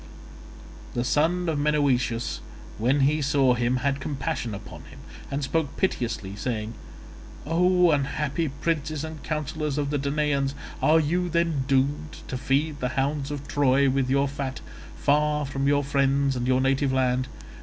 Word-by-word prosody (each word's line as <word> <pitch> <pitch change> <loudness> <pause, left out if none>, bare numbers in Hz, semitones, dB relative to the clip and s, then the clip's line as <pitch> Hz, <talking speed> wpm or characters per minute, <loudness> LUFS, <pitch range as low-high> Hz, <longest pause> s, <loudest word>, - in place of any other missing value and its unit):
The 120 - 0
son 165 +7 +1
of 155 -3 0
Menoetius 135 -6 +1 0.4
when 130 +6 +2
he 150 +3 +3
saw 135 -2 +3
him 120 +1 +1
had 140 0 +1
compassion 135 -5 -3
upon 105 +2 -10
him - - -14 0.3
and 140 +1 -2
spoke 145 +1 -1
piteously 120 - -1
saying, 110 -1 -3 0.7
"O 180 +2 +4
unhappy 150 +2 0
princes 150 +1 -2
and 160 -1 -6
counsellors 150 -1 -3
of 145 -1 -1
the 145 - 0
Danaans, 140 -1 0 0.3
are 160 +1 +5
you 175 +4 0
then 165 -5 +1
doomed 140 +3 0
to - - -3
feed 145 +4 0
the 125 - -1
hounds 140 +1 0
of 145 -1 -5
Troy 140 -1 +3
with 135 -1 0
your 140 +1 +3
fat, 140 -1 -4 0.4
far 150 +1 +2
from 135 0 -2
your 145 0 +3
friends 140 0 +2
and 125 0 -2
your 130 0 +3
native 135 +1 +2
land? 130 -1 +1
140 Hz, 155 wpm, -26 LUFS, 130-150 Hz, 0.7 s, are